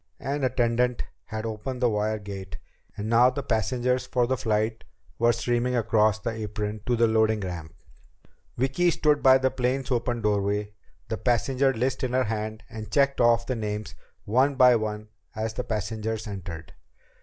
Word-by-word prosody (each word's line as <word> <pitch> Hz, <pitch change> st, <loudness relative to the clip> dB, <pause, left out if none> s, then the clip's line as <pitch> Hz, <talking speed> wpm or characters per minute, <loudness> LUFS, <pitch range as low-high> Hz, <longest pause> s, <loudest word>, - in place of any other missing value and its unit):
An 140 Hz, +1 st, -3 dB
attendant 125 Hz, -1 st, +1 dB, 0.2 s
had 110 Hz, 0 st, -5 dB
opened 115 Hz, +4 st, -4 dB
the 125 Hz, -, +3 dB
wire 110 Hz, -1 st, 0 dB
gate, 100 Hz, -2 st, -8 dB, 0.4 s
and 105 Hz, -, -4 dB
now 120 Hz, +2 st, +5 dB
the 135 Hz, +2 st, -4 dB
passengers 125 Hz, +3 st, 0 dB
for 125 Hz, -2 st, +1 dB
the 130 Hz, +2 st, 0 dB
flight 110 Hz, -2 st, -1 dB, 0.4 s
were 120 Hz, +1 st, +5 dB
streaming 120 Hz, +1 st, 0 dB
across 110 Hz, -2 st, +3 dB
the 115 Hz, +2 st, -3 dB
apron 105 Hz, -1 st, -4 dB
to 125 Hz, -, +2 dB
the 115 Hz, 0 st, +4 dB
loading 110 Hz, -1 st, +2 dB
ramp. 85 Hz, -4 st, -6 dB, 0.8 s
Vicki 135 Hz, +8 st, +2 dB
stood 150 Hz, -3 st, +2 dB
by 130 Hz, 0 st, +7 dB
the 130 Hz, 0 st, +1 dB
plane's 130 Hz, +2 st, -1 dB
open 120 Hz, -1 st, -1 dB
doorway, 105 Hz, 0 st, 0 dB, 0.4 s
the -, -, -2 dB
passenger 130 Hz, +3 st, +2 dB
list 130 Hz, +2 st, -1 dB
in 125 Hz, -1 st, -1 dB
her 130 Hz, 0 st, +3 dB
hand, 110 Hz, -1 st, -4 dB
and 110 Hz, -2 st, -8 dB
checked 140 Hz, -2 st, +2 dB
off 115 Hz, 0 st, +4 dB
the 130 Hz, -, -2 dB
names 105 Hz, -1 st, -4 dB, 0.3 s
one 130 Hz, +6 st, +2 dB
by 125 Hz, -2 st, +6 dB
one 110 Hz, -1 st, -3 dB, 0.3 s
as 110 Hz, 0 st, -2 dB
the 125 Hz, -, -3 dB
passengers 110 Hz, 0 st, -3 dB
entered. 90 Hz, -6 st, -7 dB
115 Hz, 165 wpm, -26 LUFS, 105-125 Hz, 0.8 s, by